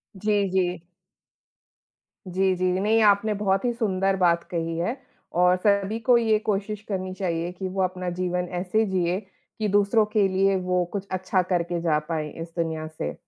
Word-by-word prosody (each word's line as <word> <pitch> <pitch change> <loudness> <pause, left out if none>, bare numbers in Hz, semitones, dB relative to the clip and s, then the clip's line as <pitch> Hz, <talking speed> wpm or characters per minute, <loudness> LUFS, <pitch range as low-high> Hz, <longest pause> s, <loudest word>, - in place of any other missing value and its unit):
जी, 205 0 +1
जी। 180 -2 0 1.5
जी, 190 +1 +1
जी। 185 +1 -1
नहीं 220 +3 +3
आपने 210 +1 +4
बहुत 195 -1 0
ही 240 - +2
सुंदर 195 -4 0
बात 170 -2 +2
कही 165 -1 -2
है 225 +10 -1 0.4
और 180 0 +5
सभी 200 +3 +1
को 245 0 +4
ये 220 -2 +3
कोशिश 205 +1 -1
करनी 185 -1 -3
चाहिए 175 -2 -2
कि 185 +1 -5
वो 190 +1 -2
अपना 185 -1 -2
जीवन 180 0 -1
ऐसे 215 +4 +1
जिए 185 -2 0 0.4
कि 215 - 0
दूसरों 205 +2 +3
के 205 -3 +4
लिए 195 +1 +2
वो 180 -1 +2
कुछ 200 -1 -4
अच्छा 185 0 +1
करके 175 -1 -1
जा 155 -3 +2
पाएँ 155 -2 -2
इस 165 - -6
दुनिया 160 -2 -2
से। 155 - -5
185 Hz, 170 wpm, -25 LUFS, 175-205 Hz, 1.5 s, और